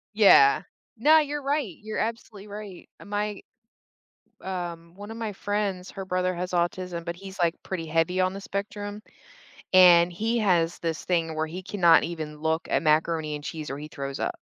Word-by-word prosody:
Yeah. 195 -10 +7 0.4
No, 305 +8 +6
you're 295 -1 -2
right. 275 - -1
You're 215 0 -5
absolutely 220 -3 -4
right. 205 -3 -9 0.2
My 205 0 -3 1.0
um, 170 -3 -5
one 205 +2 -9
of - - -7
my 225 -2 -3
friends, 200 -2 -3
her 195 - -6
brother 185 0 0
has 180 +1 -4
autism, 175 -1 -2
but 170 0 -4
he's, 190 +1 -11
like, 170 -1 +2
pretty 175 -4 -4
heavy 165 +3 0
on 185 0 +2
the 195 - -7
spectrum. 205 +1 -5 0.7
And 175 -2 +7
he 220 +7 -1
has 175 -5 +2
this 165 -1 -3
thing 165 -3 0
where 155 0 0
he 175 +4 -7
cannot 175 -4 +4
even 155 -3 -5
look 160 +1 -1
at - - +2
macaroni 155 0 +1
and 145 - -10
cheese 155 -3 -6
or 135 - -4
he 150 - -7
throws 140 -2 -6
up. - - -2
180 Hz, 180 wpm, -26 LUFS, 165-205 Hz, 1.0 s, Yeah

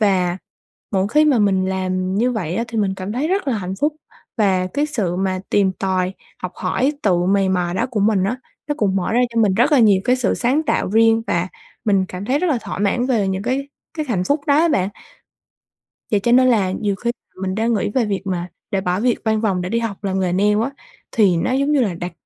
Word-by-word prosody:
Và 185 -4 +2 0.5
mỗi 190 0 +1
khi 300 +7 +4
mà 290 -5 +3
mình 195 -3 +2
làm 185 0 -1
như 240 +5 +2
vậy 180 -8 -3
á 230 - 0
thì 225 -1 -3
mình 195 -2 +1
cảm 190 +2 -5
thấy 275 +7 -1
rất 380 -6 0
là 230 - 0
hạnh 185 -1 -4
phúc 295 +1 +1 0.4
và 190 -4 +2
cái 285 +11 -1
sự 210 - -2
mà 190 0 -1
tìm 195 -2 +3
tòi, 185 -1 -1 0.3
học 180 - -4
hỏi, 255 +10 0
tự 190 -4 +3
mày 195 +1 +2
mò 180 -2 0
đó - - 0
của 220 -4 -1
mình 200 -2 +2
á, 220 +6 -1 0.3
nó 295 - 0
cũng 195 -3 +1
mở 190 +3 -1
ra 240 - +3
cho 230 - +2
mình 205 -4 +3
rất 240 +9 +3
là 285 - +6
nhiều 205 -5 +5
cái 250 +1 +3
sự 245 -6 0
sáng 260 +6 +1
tạo 310 - 0
riêng 225 +2 +4
và 170 +2 0 0.4
mình 195 -3 +2
cảm 185 +2 -6
thấy 260 +7 +1
rất 365 - 0
là 275 - +1
thỏa - - -5
mãn 210 +5 +1
về 220 -7 +1
những 190 +1 -2
cái 275 +4 -2 0.3
cái 310 -2 -2
hạnh 190 -7 0
phúc 285 +8 +1
đó 285 - +4
á 335 +2 +4
bạn. 195 - +1 1.2
Vậy 210 - +3
cho 235 +4 0
nên 255 +1 +6
là 205 -7 +2
nhiều 200 0 -1
khi 235 +4 -2 0.3
mình 190 0 -2
đã 220 +2 0
nghĩ 225 -4 +1
về 235 +3 +1
việc 200 -2 -2
mà 180 -2 -2 0.2
để 195 -1 0
bỏ 180 0 -1
việc 240 +1 +1
văn 220 -1 +1
phòng 195 -5 0
để 180 - -4
đi 230 - 0
học 220 -3 -5
làm 190 -1 -1
nghề 185 -2 0
nail 205 +3 +2
á. 255 - -1 0.4
Thì 195 -6 +3
nó 165 - 0
giống 275 +3 +1
như 285 -3 +3
là 205 -6 0
đặt 175 +1 -5
205 Hz, 250 wpm, -20 LUFS, 190-240 Hz, 1.2 s, là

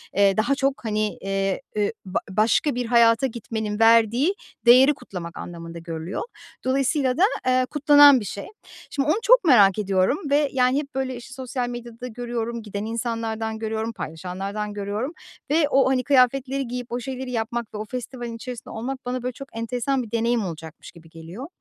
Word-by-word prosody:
eee, 200 0 +4
daha 235 +6 +2
çok, 270 -2 -1
hani, 215 -1 -1
eee, 195 0 -1
eee, 210 0 0
b 185 - -2
başka 220 +8 +2
bir 245 0 -2
hayata 235 +1 +4
gitmenin 220 -3 -4
verdiği 230 - +4 0.3
değeri 255 +4 +7
kutlamak 175 - -8
anlamında 170 -1 -8
görülüyor. 165 +2 -5 0.4
Dolayısıyla 265 0 +1
da, 355 - +4 0.2
ııı, 255 0 +3
kutlanan 290 -2 +7
bir 210 - -6
şey. 200 +2 -6 0.4
Şimdi, 280 -1 -1
onu 315 - +3
çok - - +6
merak 215 - +5
ediyorum 195 +5 +1
ve, 290 +1 +3
yani, 255 +1 +3
hep 280 -2 -8
böyle, 265 -1 -2
işte, 240 +2 -11
sosyal 255 -1 -3
medyada 240 0 -7
görüyorum, 235 -1 -4
giden 205 0 -5
insanlardan 225 -1 -3
görüyorum, 220 0 -2
paylaşanlardan 195 +4 -5
görüyorum 205 - -3 0.4
ve 300 -1 +3
o, 270 -2 +4
hani, 260 -1 +1
kıyafetleri 270 0 +2
giyip 245 0 -6
o 240 - -2
şeyleri 260 +1 -5
yapmak 235 0 -3
ve - - -5
o 215 - -4
festivalin 240 0 -6
içerisinde 240 +1 -8
olmak 255 +4 -5
bana, 250 0 -3
böyle, 250 0 -2
çok 275 +2 -10
enteresan 250 +3 -1
bir 220 - -11
deneyim 230 -1 +1
olacakmış 160 -2 -8
gibi 165 -1 -17
geliyor. 165 - -9
235 Hz, 170 wpm, -24 LUFS, 210-260 Hz, 0.4 s, değeri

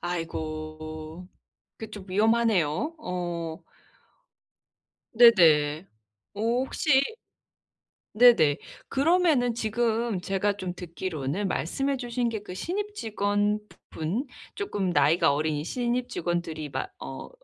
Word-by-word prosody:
아이고. 155 0 -5 0.5
그 220 -1 -7
좀 205 -3 -9
위험하네요. 220 - +2
어. 175 - -4 1.5
네네. 165 -9 +5 0.5
어 205 - -6
혹시 260 +4 +2 1.1
네네. 205 -11 +6 0.3
그러면은 290 -4 +3
지금 230 -1 0
제가 195 +2 -1
좀 185 -3 -4
듣기로는 170 0 -3
말씀해 270 - -1
주신 245 -1 -2
게 220 -2 -3
그 180 - -8
신입 405 - -3
직원 205 - 0 0.3
부분 175 - -2 0.3
쪼끔 205 - -2
나이가 145 -1 +4
어린 150 0 -1
신입 245 +6 -1
직원들이 170 -6 -3
막 385 - -4
어 - - -7
195 Hz, 205 characters per minute, -27 LUFS, 160-240 Hz, 1.5 s, 네네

